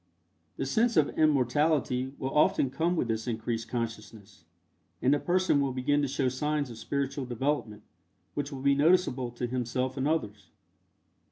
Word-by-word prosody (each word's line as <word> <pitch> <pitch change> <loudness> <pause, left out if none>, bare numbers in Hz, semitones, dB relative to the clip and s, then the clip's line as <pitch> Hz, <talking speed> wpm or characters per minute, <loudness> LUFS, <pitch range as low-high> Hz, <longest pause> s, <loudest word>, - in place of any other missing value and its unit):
The - - -2
sense 225 - +1
of 150 -2 +4
immortality 140 -2 +2
will 135 0 -3
often 145 -3 +3
come 170 +5 0
with 145 - 0
this 115 +1 -2
increased 115 0 -3
consciousness, 105 -6 -6 0.5
and 130 +2 +3
the 145 - +2
person 180 -4 +2
will 135 -2 0
begin 145 +3 +1
to 140 - 0
show 135 0 0
signs 145 +1 -1
of 115 - -10
spiritual 140 +1 -2
development 120 -3 -2 0.5
which 145 0 -3
will 135 -1 -7
be 140 0 +4
noticeable 145 -4 +2
to 120 +1 -4
himself 125 +2 -2
and 135 +1 0
others. 110 -10 -2
130 Hz, 160 wpm, -29 LUFS, 120-145 Hz, 0.5 s, of